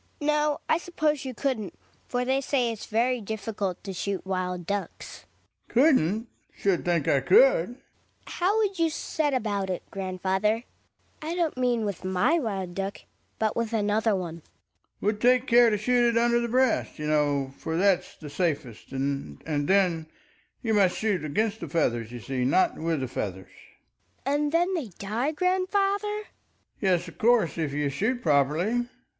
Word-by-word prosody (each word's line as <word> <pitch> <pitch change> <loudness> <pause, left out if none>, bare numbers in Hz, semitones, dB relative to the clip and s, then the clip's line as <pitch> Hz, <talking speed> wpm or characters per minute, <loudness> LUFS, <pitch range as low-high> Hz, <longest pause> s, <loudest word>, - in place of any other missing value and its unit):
Hedvig. 295 - -3
No, 300 -1 +2
I 315 - +3
suppose 305 -5 -1
you 260 -2 -5
couldn't; 235 -9 -2 0.3
for 245 0 -1
they 265 +2 +1
say 255 -3 +1
it's 220 - -7
very 240 +2 +1
difficult 205 -3 -4
to 195 - -5
shoot 195 +1 -3
wild 180 -2 -2
ducks. 200 +2 -5 0.4
Ekdal. - - -18
Couldn't? 235 - +3 0.3
Should 195 -3 0
think 170 -4 +1
I 140 - +4
could. - - +4
Hedvig. - - -23 0.5
How 380 +5 0
would 400 -4 0
you 330 -1 +3
set 305 -2 -1
about 205 -5 -1
it, 180 - -3
grandfather 190 +3 -1 0.3
— - - -39
I 320 +3 -3
don't 340 -3 0
mean 245 -3 +1
with 200 -4 -4
my 190 - +2
wild 195 - -3
duck, 195 +2 -4 0.4
but 220 -1 0
with 230 -1 -2
another 215 0 +2
one? 170 -3 -4
Ekdal. 165 - -27
Would 210 +1 0
take 250 +1 +4
care 240 -1 +6
to 210 - +1
shoot 240 +3 +3
it 230 - +1
under 235 0 +3
the 235 - -1
breast, 255 0 +1
you 150 - -5
know, 145 -3 +1
for 160 0 -3
that's 190 0 +2
the 150 -3 -10
safest. 145 - -2
And 135 - -3
then 160 +2 +1 0.6
you 225 -2 +1
must 195 -4 +3
shoot 205 -7 0
against 210 +9 -1
the - - -6
feathers, 120 -9 0
you 120 -1 -7
see, 130 +2 -2
not 140 +9 +3
with 160 -3 -1
the 130 - -2
[feathers. 95 -6 -5 0.7
Hedvig. 275 - +1
And 290 0 +1
then 350 +3 +2
they 320 -9 -2
die, 225 +9 -1
grandfather? 390 +4 0
Ekdal. 425 - -15 0.5
Yes, 180 -3 +2
of 170 - -12
course, 225 -7 +3
if 155 -3 -1
you 145 0 -1
shoot 225 - -1
properly 165 - +2
210 Hz, 175 wpm, -27 LUFS, 175-255 Hz, 0.7 s, care